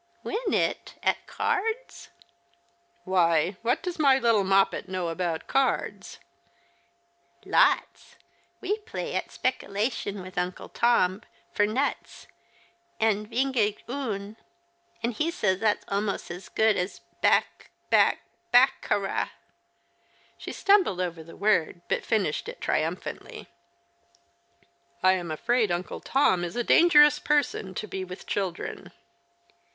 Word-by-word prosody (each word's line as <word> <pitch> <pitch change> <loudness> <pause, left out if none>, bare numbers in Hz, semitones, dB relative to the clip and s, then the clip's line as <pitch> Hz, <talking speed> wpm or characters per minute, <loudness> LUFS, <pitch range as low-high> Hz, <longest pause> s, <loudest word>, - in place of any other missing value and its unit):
" 345 - -37
Win 440 0 -2
it? - - -1
At - - 0
cards? 450 +5 -2 0.3
" - - -40
" 345 0 -40
Why, 175 -1 +2
what 235 +2 0
does 360 -2 -4
my 275 -3 +5
little 230 -5 +3
Moppet 195 0 +2
know 185 -2 -2
about 165 -1 -3
cards? 270 -1 -1 0.5
" 350 - -39
" 345 0 -35
Lots. - - +2 0.5
We 415 +3 -1
play 430 +2 -6
at - - -2
spekilation 205 -4 -2
with 185 0 -5
Uncle 180 0 -4
Tom, 205 -5 +2 0.3
for 205 - +2
nuts, 260 +7 -3 0.7
and 215 -1 +1
vingt 260 +3 0
et 210 -2 +1
un, 220 -6 -4 0.7
and 235 +1 0
he 305 +9 -1
says 200 - 0
that's 215 -1 +1
almost 200 -2 -2
as 180 +2 -9
good 220 -1 +2
as 180 +2 -3 0.2
bac - - +1 0.2
bac - - +4 0.3
bac 255 +2 +5
ca - - +1
ra! 200 -1 -2 0.5
" - - -36
She - - -6
stumbled 395 - +3
over 170 -3 -3
the 165 - -13
word, 180 -4 +1
but - - -1
finished 200 -9 -1
it - - -9
triumphantly. 160 +4 -3 0.8
" 140 - -39
I 185 - +6
am 180 -3 -2
afraid 220 +8 +1
Uncle 175 +1 -3
Tom 185 -10 +2
is 175 +5 -5
a 240 - 0
dangerous 295 -1 +6
person 275 -10 0
to 215 - -3
be 190 -1 -4
with 185 +1 -9
children." 190 -4 -4
210 Hz, 140 wpm, -26 LUFS, 185-265 Hz, 0.8 s, I